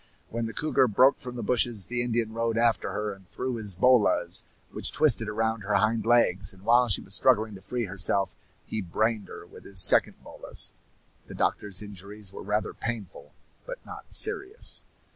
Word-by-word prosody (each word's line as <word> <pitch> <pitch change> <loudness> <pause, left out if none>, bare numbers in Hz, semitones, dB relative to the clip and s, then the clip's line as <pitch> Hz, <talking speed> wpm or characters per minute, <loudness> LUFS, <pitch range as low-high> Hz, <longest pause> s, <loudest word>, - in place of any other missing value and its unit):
When 115 0 -3
the 115 - -7
cougar 150 0 +2
broke 130 +5 +4
from 125 -2 -7
the 120 - -5
bushes, 120 -4 +2
the 120 0 -1
Indian 115 -2 0
rode 115 0 -1
after 115 -1 +1
her, 105 -1 -3
and 95 -2 -18
threw 130 -1 -4
his 105 -4 -1
bolas, 125 +2 +3 0.3
which - - -3
twisted - - +4
around 110 +1 -1
her 105 +1 -1
hind 110 0 +1
legs; 115 -7 +3
and 95 - -19
while 120 +3 +4
she 100 - +2
was 95 - -4
struggling 110 -2 +3
to 95 - -11
free 120 +5 -3
herself, 100 +1 0 0.3
he 110 - -4
brained 105 +4 -1
her - - -10
with - - -15
his 95 -2 -3
second - - +6
bolas. - - -3 0.5
The - - -10
doctor's 100 -1 0
injuries 100 0 -9
were - - -8
rather 105 +1 -2
painful, 115 -5 -7 0.3
but - - -6
not - - -11
serious. 420 +1 -1
110 Hz, 180 wpm, -27 LUFS, 100-120 Hz, 0.5 s, second